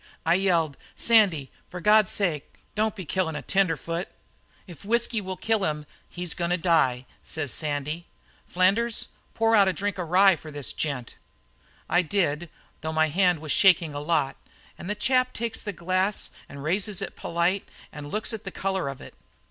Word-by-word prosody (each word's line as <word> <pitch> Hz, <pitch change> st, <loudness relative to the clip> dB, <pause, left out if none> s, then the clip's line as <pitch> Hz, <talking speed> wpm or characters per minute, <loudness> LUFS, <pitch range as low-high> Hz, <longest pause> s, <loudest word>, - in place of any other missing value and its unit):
"I 165 Hz, -, +4 dB
yelled: 170 Hz, -6 st, +2 dB, 0.2 s
'Sandy, 195 Hz, -, +3 dB, 0.2 s
for 180 Hz, -, -7 dB
God's 210 Hz, +2 st, +5 dB
sake, 170 Hz, -8 st, -2 dB, 0.2 s
don't 215 Hz, +1 st, 0 dB
be 190 Hz, -4 st, -7 dB
killin' 165 Hz, -1 st, -1 dB
a -, -, -5 dB
tenderfoot!' 170 Hz, -2 st, 0 dB, 0.6 s
"'If 175 Hz, -1 st, -12 dB
whisky 235 Hz, +1 st, +1 dB
will 190 Hz, -1 st, -5 dB
kill 220 Hz, 0 st, +1 dB
him 150 Hz, -3 st, -1 dB, 0.2 s
he's 175 Hz, -1 st, -3 dB
goin' 170 Hz, -1 st, -2 dB
to 180 Hz, -, +2 dB
die,' 160 Hz, -8 st, +2 dB, 0.2 s
says 150 Hz, -5 st, -2 dB
Sandy. 150 Hz, +2 st, -2 dB, 0.4 s
'Flanders, 200 Hz, +6 st, +1 dB, 0.3 s
pour 225 Hz, 0 st, +3 dB
out 200 Hz, -2 st, +6 dB
a 190 Hz, -, +2 dB
drink 200 Hz, +3 st, -3 dB
of 170 Hz, -3 st, -4 dB
rye 190 Hz, +1 st, +6 dB
for 155 Hz, -, -11 dB
this 145 Hz, -2 st, -5 dB
gent.' 140 Hz, -6 st, -4 dB, 0.7 s
"I 175 Hz, -, +3 dB
did 170 Hz, -4 st, 0 dB
it, -, -, -20 dB, 0.3 s
though 160 Hz, 0 st, -3 dB
my 160 Hz, 0 st, +2 dB
hand 180 Hz, 0 st, +2 dB
was 155 Hz, -2 st, -4 dB
shaking 175 Hz, -5 st, +4 dB
a 145 Hz, -, -4 dB
lot, 150 Hz, -3 st, 0 dB, 0.4 s
and 175 Hz, -, -8 dB
the 210 Hz, -, 0 dB
chap 255 Hz, +3 st, +1 dB
takes 230 Hz, 0 st, -3 dB
the 205 Hz, -, -4 dB
glass 185 Hz, +3 st, 0 dB, 0.2 s
and 140 Hz, 0 st, -9 dB
raises 190 Hz, +4 st, 0 dB
it -, -, -6 dB
polite, 175 Hz, +3 st, -1 dB, 0.2 s
and 145 Hz, -1 st, -8 dB
looks 220 Hz, +2 st, -2 dB
at 220 Hz, -, -5 dB
the 195 Hz, -, -5 dB
colour 190 Hz, -5 st, -2 dB
of 135 Hz, -, -8 dB
it. -, -, -11 dB
180 Hz, 180 wpm, -26 LUFS, 155-200 Hz, 0.7 s, out